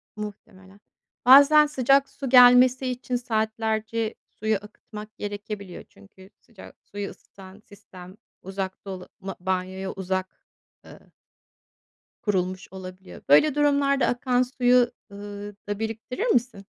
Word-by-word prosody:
Muhtemelen. 200 Hz, -2 st, -10 dB, 0.5 s
Bazen 285 Hz, +4 st, +8 dB
sıcak 275 Hz, -1 st, +2 dB
su 270 Hz, -, -6 dB
gelmesi 250 Hz, +1 st, +6 dB
için 250 Hz, 0 st, -3 dB
saatlerce 220 Hz, -1 st, -2 dB, 0.2 s
suyu 215 Hz, +1 st, +1 dB
akıtmak 210 Hz, +1 st, -10 dB
gerekebiliyor. 205 Hz, -2 st, -7 dB
Çünkü 190 Hz, -, -18 dB
sıcak 225 Hz, -6 st, -15 dB
suyu 205 Hz, 0 st, -7 dB
ısıtan 190 Hz, +1 st, -15 dB
sistem 190 Hz, -3 st, -15 dB, 0.3 s
uzak 190 Hz, 0 st, -6 dB
dolu 185 Hz, -2 st, -8 dB
ma 195 Hz, 0 st, -7 dB
banyoya 190 Hz, +1 st, -3 dB
uzak, 190 Hz, 0 st, -3 dB, 0.6 s
ııı -, -, -16 dB, 1.1 s
kurulmuş 185 Hz, -3 st, -2 dB
olabiliyor. 185 Hz, 0 st, -11 dB
Böyle 260 Hz, -, +5 dB
durumlarda 280 Hz, -2 st, +2 dB
akan 245 Hz, 0 st, +1 dB
suyu, 250 Hz, -1 st, +2 dB, 0.2 s
ııı, 205 Hz, 0 st, -9 dB
da 205 Hz, 0 st, -3 dB
biriktirir 225 Hz, -, -4 dB
misin? 240 Hz, -, 0 dB
210 Hz, 110 wpm, -25 LUFS, 190-250 Hz, 1.1 s, Bazen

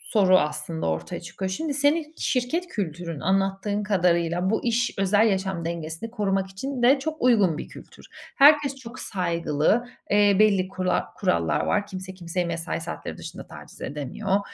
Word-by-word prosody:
soru 185 Hz, -3 st, +6 dB
aslında 160 Hz, +1 st, -2 dB
ortaya 80 Hz, 0 st, -3 dB
çıkıyor. 190 Hz, +2 st, -5 dB
Şimdi, 295 Hz, +9 st, -2 dB
senin 300 Hz, +2 st, +1 dB
şirket 275 Hz, +8 st, -1 dB
kültürün 170 Hz, -, -4 dB
anlattığın 195 Hz, +3 st, 0 dB
kadarıyla 180 Hz, -2 st, +1 dB
bu 220 Hz, -, 0 dB
iş 240 Hz, 0 st, +1 dB
özel, 205 Hz, +3 st, +4 dB
yaşam 190 Hz, -4 st, -1 dB
dengesini 165 Hz, +6 st, -5 dB
korumak 195 Hz, -3 st, 0 dB
için 255 Hz, +7 st, -5 dB
de 265 Hz, +3 st, +6 dB
çok 315 Hz, +3 st, -4 dB
uygun 210 Hz, -10 st, +4 dB
bir -, -, -6 dB
kültür. -, -, -14 dB, 0.3 s
Herkes 285 Hz, -1 st, +6 dB
çok 250 Hz, -2 st, -10 dB
saygılı, 170 Hz, +3 st, 0 dB, 0.3 s
eee, 205 Hz, -1 st, +5 dB
belli 200 Hz, -3 st, +4 dB
kura 185 Hz, -1 st, -1 dB
kurallar 85 Hz, -1 st, +1 dB
var. 205 Hz, -1 st, +1 dB
Kimse 185 Hz, 0 st, -7 dB
kimseyi 175 Hz, 0 st, -3 dB
mesai 170 Hz, 0 st, -3 dB
saatleri 170 Hz, +1 st, -6 dB
dışında -, -, -9 dB
taciz -, -, -13 dB
edemiyor 150 Hz, +8 st, -2 dB
195 Hz, 155 wpm, -25 LUFS, 170-230 Hz, 0.3 s, soru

